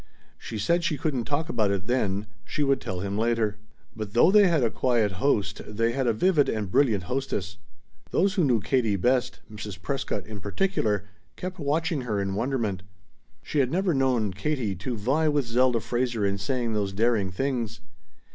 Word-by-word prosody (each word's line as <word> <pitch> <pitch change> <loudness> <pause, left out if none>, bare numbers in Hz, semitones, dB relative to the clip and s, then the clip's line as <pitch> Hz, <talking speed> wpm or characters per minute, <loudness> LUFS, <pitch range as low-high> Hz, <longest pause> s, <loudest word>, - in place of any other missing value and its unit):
She 110 - -6
said 170 +12 +1
she 155 -2 0
couldn't 135 -5 -1
talk 150 +3 -1
about 110 -11 +1
it 100 -1 -1
then; 105 -4 0 0.2
she 150 - -2
would 135 -2 +2
tell 90 -1 -4
him 100 +1 -2
later. 115 -2 +1 0.4
But 110 -3 -6
though 120 +10 +6
they 205 -1 +7
had 165 -6 +2
a 115 - +2
quiet 115 -5 +1
host 125 -8 +1
they 115 +2 0
had 130 +1 -1
a - - +5
vivid 150 - +3
and 110 -2 -1
a - - -11
brilliant 110 -8 +3
hostess. 100 -4 -3 0.5
Those 195 +2 +2
who 190 -4 +2
knew 120 -7 +3
Katie 115 -3 +1
best, 125 +5 +1
Mrs. 105 -3 -7
Prescott 130 -1 -3
in 105 -1 -8
particular, 105 - 0 0.3
kept 185 0 -6
watching 155 +1 0
her 110 -5 -2
in 95 -1 -1
wonderment. 110 -4 -1 0.6
She 150 - -1
had 130 -3 +3
never 185 +1 +1
known 125 -7 +1
Katie 120 -1 -1
to 115 +6 -4
vie 135 +9 +1
with 145 -3 +1
Zelda 120 +1 +2
Fraser 120 -2 -1
in 100 0 0
saying 115 +3 -1
those 100 -2 -1
daring 110 -2 +2
things. 115 0 -2
120 Hz, 185 wpm, -26 LUFS, 105-140 Hz, 0.6 s, they